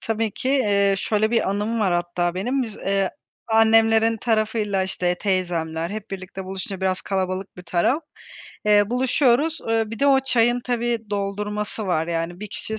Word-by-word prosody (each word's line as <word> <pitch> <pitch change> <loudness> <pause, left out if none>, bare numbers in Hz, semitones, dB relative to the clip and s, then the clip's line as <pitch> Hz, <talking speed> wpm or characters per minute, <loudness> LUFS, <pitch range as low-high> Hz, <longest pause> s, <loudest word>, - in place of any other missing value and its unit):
Tabii 225 0 -1
ki, 255 - -4
eee, 200 -7 +3
şöyle 215 +2 +1
bir 230 -4 +1
anım 210 +3 -1
var 190 -4 +2
hatta 175 0 -1
benim: 250 +9 -1
Biz, 220 -4 -4
eee, 195 -1 0 0.4
annemlerin 225 0 +4
tarafıyla, 215 -3 0
işte, 180 -1 -1
teyzemler 170 -4 -1
hep 210 -1 -7
birlikte 190 0 -7
buluşunca 190 0 -6
biraz 190 -1 0
kalabalık 190 0 -3
bir 180 - -9
taraf, 180 - +1 0.6
eee, 205 0 +4
buluşuyoruz. 260 +4 +2
Eee, 225 0 +2
bir 230 - -6
de 280 - +2
o 270 -1 +5
çayın 240 -2 +2
tabii 240 -1 0
doldurması 205 +1 -3
var, 165 -3 0
yani, 170 +1 -3
1 210 - -6
kişi 220 0 -5
210 Hz, 165 wpm, -23 LUFS, 185-225 Hz, 0.6 s, o